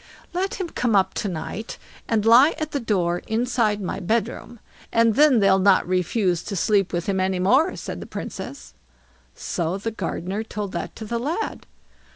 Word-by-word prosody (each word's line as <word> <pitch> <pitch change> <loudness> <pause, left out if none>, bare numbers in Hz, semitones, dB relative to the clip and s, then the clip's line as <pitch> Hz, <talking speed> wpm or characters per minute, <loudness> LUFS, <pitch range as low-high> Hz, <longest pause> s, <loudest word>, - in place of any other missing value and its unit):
"Let 375 +2 -1
him 370 - -3
come 240 -7 0
up 190 -1 +3
to 210 - -2
night, 195 +5 -5 0.3
and 220 -2 +1
lie 245 +7 +7
at 310 -1 -4
the 285 - -1
door 180 -7 0
inside 225 -2 +1
my 190 - -4
bedroom, 230 +4 -2 0.3
and 230 -1 +4
then 290 0 +5
they'll 195 -1 +4
not 190 -1 +4
refuse 180 0 +1
to 200 - -4
sleep 195 +1 +2
with 175 -1 -2
him 195 -1 0
any 185 0 0
more", 260 - +3
said - - -6
the - - -8
Princess. 190 -7 -7 0.6
So 170 +2 -2
the 225 +3 -4
gardener 190 0 -3
told 210 -3 -5
that - - -5
to 220 - -7
the 235 +2 -2
lad. 320 - -3
210 Hz, 180 wpm, -23 LUFS, 190-235 Hz, 0.6 s, lie